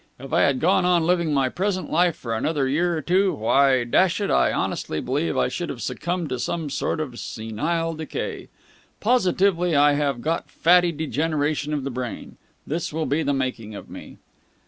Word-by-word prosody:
If 135 +1 -9
I - - +4
had 140 -2 +3
gone 180 +4 +3
on 180 -2 +3
living 170 -2 +1
my 135 -2 +2
present 185 +6 -2
life 175 +1 +3
for 115 -2 -5
another 140 +4 0
year 170 +5 +1
or - - -3
two, 190 +2 +2
why, 130 +3 +3
dash 170 - +2
it, 200 - -1
I - - +3
honestly 80 - -2
believe 140 - -1
I - - +2
should 175 - -4
have 125 - -6
succumbed 175 +5 -3
to 130 -1 -3
some 150 +4 -3
sort 140 - -1
of 130 -6 -5
senile 155 +10 -2
decay. 160 -1 -5 0.5
Positively 185 -6 +2
I 145 +1 +5
should 145 - 0
have 140 -4 -1
got 165 +2 -2
fatty 175 +1 +4
degeneration 150 -1 -1
of 145 -3 -2
the 140 - -3
brain! 125 -2 -6 0.3
This 165 +3 -3
will 160 +1 -2
be 145 +4 0
the 145 - 0
making 125 -5 -3
of - - -10
me." - - -10
155 Hz, 190 wpm, -23 LUFS, 135-175 Hz, 0.5 s, I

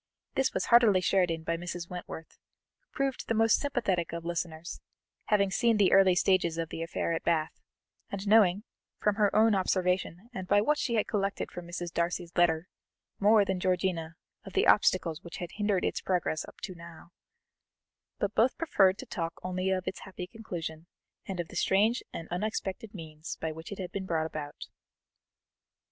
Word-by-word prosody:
This 270 0 +1
was - - -1
heartily 235 -5 +6
shared 185 -1 +2
in 165 -1 -3
by 165 +1 -1
Mrs. 175 0 -5
Wentworth, 175 -2 -8 0.4
who - - -45
proved 275 -1 -2
the 225 - 0
most 225 +1 +4
sympathetic 205 - -1
of 170 0 -5
listeners, 170 -1 -4 0.4
having 200 -2 +2
seen 230 +2 +3
the 200 -3 +4
early 190 -2 +6
stages 180 -3 +2
of 165 -1 -2
the 165 - -5
affair 165 0 -2
at 165 - -1
Bath, 165 -1 0 0.5
and 200 +1 -5
knowing, 205 -2 +5 0.4
from 210 0 +1
her 210 -2 +4
own 220 +1 +5
observation 185 0 0
and 185 -4 -5
by 205 - +5
what 295 +8 +2
she 235 - 0
had 215 - +2
collected 200 -1 -2
from 175 -1 -8
Mrs. 175 0 -5
Darcy's 170 0 -2
letter, 170 -1 +3 0.5
more 210 0 +5
than 190 -1 -1
Georgiana 180 -3 -1 0.3
of 195 -3 -10
the - - +3
obstacles 175 -5 +3
which 170 - -9
had 175 - -6
hindered 205 -3 +1
its - - -1
progress 175 -4 -1
up - - -14
to 185 - -5
now; 170 0 -13 1.1
but 205 0 -1
both 245 +4 +3
preferred 200 - +3
to 265 - -7
talk 165 -7 -3
only 185 +1 -1
of 185 -1 -1
its - - -3
happy 185 -1 -7
conclusion, 175 -6 -7 0.4
and 190 -3 -4
of 170 - -3
the - - -11
strange 215 +5 +3
and 165 - -6
unexpected 205 +2 -3
means 160 -2 -7
by 160 - -2
which 160 +3 -9
it 200 - -5
had 185 -2 -5
been 195 -1 -4
brought 160 -2 0
about. 150 -2 -6
185 Hz, 185 wpm, -30 LUFS, 170-205 Hz, 1.1 s, heartily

